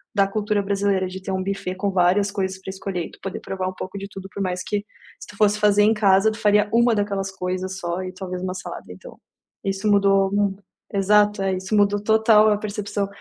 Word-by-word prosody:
da 200 -1 +4
cultura 210 0 -1
brasileira, 195 -1 0
de 185 +1 -8
ter 190 - -5
um 190 0 -1
buffet 190 -1 -3
com 200 +1 -1
várias 190 +2 +2
coisas 190 -1 -3
pra 190 - -9
escolher, 190 -2 -4
e - - -16
tu - - -17
poder 195 0 -5
provar 190 -1 -4
um - - -7
pouco 185 +1 -7
de 200 0 -6
tudo. 195 -1 -9
Por 200 - -4
mais 180 -1 -2
que, 210 - -1 0.4
se - - -11
tu 205 - -13
fosse 210 0 +3
fazer 205 0 +4
em 215 +2 +5
casa, 205 0 +4
tu 215 - -8
faria 210 0 +3
uma 235 0 +4
daquelas 200 -2 -1
coisas 185 0 -4
só 175 -1 -3
e 185 - -5
talvez 185 -1 -6
uma 185 0 -3
salada. - - -7
Então, - - -12 0.4
isso 195 +2 -2
mudou 195 -1 +3
Hum 200 -1 +1 0.4
Exato, 205 +1 +3
eh, 190 0 0
isso 190 +3 -2
mudou 205 0 +3
total 220 0 +5
a 210 - +2
percepção 205 -1 -3
195 Hz, 225 wpm, -22 LUFS, 190-205 Hz, 0.4 s, em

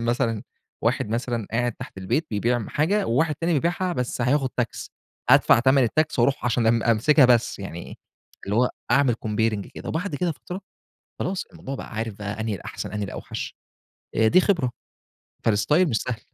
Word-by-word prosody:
مثلًا 115 -2 0 0.4
واحد، - - +1
مثلًا 115 -1 -2
قاعد 120 +1 +1
تحت 125 -4 -10
البيت 150 - 0
بيبيع 115 +3 +1
م 110 - -6
حاجة 195 +8 +1
وواحد 150 +6 +2
تاني 170 +4 -1
بيبيعها 175 +4 0
بس 125 -3 -3
هياخد 130 +2 +2
tax 120 - -3 0.4
أدفَع - - +7
تمَن 130 +1 +4
الtax 155 +6 0
وأرُوح 130 +3 +2
عشان 120 -1 +1
أم 115 0 +3
أمسِكها 135 +6 +5
بس، 125 -2 +3
يعني 90 -4 -7 0.5
اللي 100 +2 -1
هو 125 +1 +3 0.2
أعمل 130 -1 +4
comparing 105 -1 0
كده - - -7
وبَعد 165 +1 -2
كده 170 +3 0
فترة، 180 +5 -8 0.6
خلاص، 190 +1 -2
الموضوع 135 - -6
بقى 130 - -8
عارف 110 0 -2
بقي 105 +2 -6
أنهي 110 -2 -1
الأحسن، 90 - -6
أنهي 105 0 -2
الأوحش - - -6 0.6
آآ، 110 0 +4
دي 185 - +6
خبرة. 170 -11 +1 0.8
فالstyle 115 - +3
مش 115 - 0
سهْل. 120 -3 -4
120 Hz, 175 wpm, -24 LUFS, 110-150 Hz, 0.8 s, أدفَع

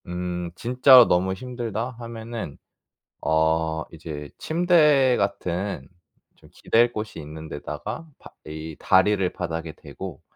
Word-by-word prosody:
음 90 0 -3
'진짜로 125 +2 +7
너무 95 +2 +2
힘들다.' 120 +1 -4
하면은 115 -7 -7 0.6
어 80 +1 +1
이제 75 -2 -7
침대 150 -6 +4
같은 100 -1 -2 0.5
좀 - - -20
기댈 120 +1 +2
곳이 105 -6 -5
있는 80 +1 -9
데다가 75 - -6
바 - - -14 0.2
이 80 0 -7
다리를 95 0 +3
바닥에 80 -2 -4
대고 - - -9
95 Hz, 225 characters per minute, -24 LUFS, 80-120 Hz, 0.6 s, 진짜로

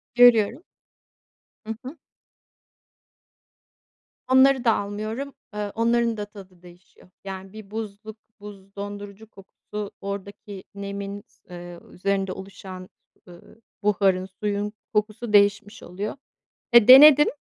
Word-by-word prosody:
Görüyorum. 245 - +5 1.0
Hı 225 - -4
hı. 275 +6 -8 2.3
Onları 260 0 +5
da 230 -3 +4
almıyorum. 215 +7 -5 0.2
Eee, 210 -1 -4
onların 230 0 +1
da 210 - -4
tadı 190 -4 -15
değişiyor. 180 +1 -19
Yani, 190 0 -8
bir 215 -2 -12
buzluk, 220 0 -7 0.2
buz 200 -1 -13
dondurucu 205 +1 -8
kokusu 200 +1 -9
oradaki 200 0 -7
nemin 200 0 -6
s - - -34
eee, 175 -1 -10
üzerinde 195 0 -1
oluşan, 190 -1 -10 0.4
ııı, 175 +5 -17 0.2
buharın 195 -2 +2
suyun 205 +2 -4 0.2
kokusu 215 +1 -2
değişmiş 205 +1 +2
oluyor. 200 +7 -5 0.6
Eee, 235 -2 +7
denedim, 295 +3 +9
205 Hz, 105 wpm, -24 LUFS, 195-220 Hz, 2.3 s, denedim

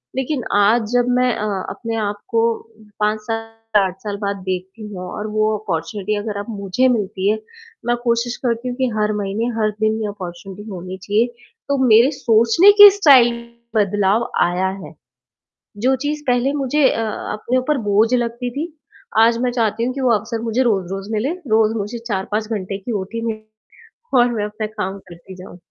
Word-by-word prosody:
लेकिन 265 0 -2 0.2
आज 220 +3 +3
जब 245 0 +3
मैं 250 -1 +2
अ, 210 - -2 0.2
अपने 230 -1 -5
आप 205 0 -4
को 225 -1 +2 0.6
5 210 +1 +1
साल, 225 +1 -4 0.3
8 190 -2 -1
साल 205 -1 -4
बाद 200 0 -2
देखती 185 +4 -4
हूँ 180 -1 -6
और 210 - -5
वो 215 0 +1
अपॉर्चुनिटी 205 +1 -3
अगर 205 0 -4
अब 205 - -5
मुझे 200 +6 +1
मिलती 205 -5 0
है, 215 +1 +1 0.5
मैं 240 0 +2
कोशिश 235 0 0
करती 235 +1 -1
हूँ 245 - -4
कि 260 -1 +1
हर 215 0 +1
महीने, 200 +3 -2
हर 215 -1 +2
दिन 220 0 +1
ये 215 - -1
अपॉर्चुनिटी 195 +1 -8
होनी 185 -1 -7
चाहिए। 215 +4 +2 0.4
तो 280 - +2
मेरे 235 +4 +6
सोचने 235 - +5
के 410 - +13
स्टाइल 245 -9 +6 0.3
बदलाव 205 +2 +2
आया 180 +2 +1 0.2
है। 150 +1 -10 0.9
जो 265 +1 +4
चीज़ 300 +1 -2
पहले 250 +2 +2
मुझे 280 0 +2
अ, - - -2 0.3
अपने 240 +4 -1
ऊपर 270 +3 0
बोझ 215 +4 +3
लगती 240 0 -1
थी, 305 +7 -5 0.5
आज 230 +1 +5
मैं 250 - +1
चाहती 230 -1 0
हूँ 255 +1 -2
कि 275 - -4
वो 255 -2 +3
अवसर 225 +2 -5
मुझे 230 +2 0
रोज़-रोज़ 195 -3 -1
मिले। 220 +6 0 0.3
रोज़ 220 0 +3
मुझे 210 +4 -4
4-5 210 +1 -2
घंटे 195 -3 -3
की 215 +5 -6
ओटी 230 +4 -6
मिले 215 -1 -3 0.8
और 240 0 +4
मैं 210 -2 -1
अपना 215 +1 -4
काम 210 -2 -4
करती 175 +2 -12
जाऊँ। 180 -1 -11
220 Hz, 180 wpm, -19 LUFS, 205-240 Hz, 0.9 s, के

